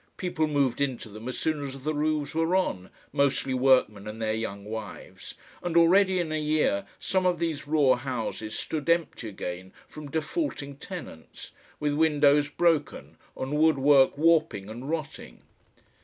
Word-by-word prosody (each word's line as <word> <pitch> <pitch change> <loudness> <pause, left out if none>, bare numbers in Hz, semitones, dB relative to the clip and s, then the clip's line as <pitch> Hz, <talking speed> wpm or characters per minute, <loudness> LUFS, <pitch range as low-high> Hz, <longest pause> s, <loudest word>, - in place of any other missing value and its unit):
People 165 -4 -1
moved 140 -3 0
into 130 -5 -2
them 110 +3 -9
as 130 - -4
soon 155 -2 -1
as 135 -1 -7
the 155 +2 -1
roofs 150 -1 -1
were 165 +3 +1
on, 95 - -1 0.2
mostly 140 -1 +1
workmen 125 -6 +3
and 105 +1 -7
their 110 -1 0
young 100 -2 -4
wives, 110 +1 -8 0.3
and 170 -1 -1
already 185 +2 +5
in 165 -3 -2
a 155 0 -1
year 150 -10 +1
some 185 -1 0
of 180 -1 +1
these 160 -3 -3
raw 145 -4 +4
houses 120 -4 -4
stood 155 0 -3
empty 165 -9 0
again 95 -1 -6 0.2
from 150 -2 -10
defaulting 160 - -3
tenants, 170 - -9 0.3
with 150 -1 0
windows 145 -1 +3
broken 165 -1 0 0.2
and 135 +3 -3
wood 160 -2 +4
work 135 0 +4
warping 155 -11 +2
and 125 +5 -7
rotting. 160 -2 -5
145 Hz, 155 wpm, -27 LUFS, 125-160 Hz, 0.3 s, already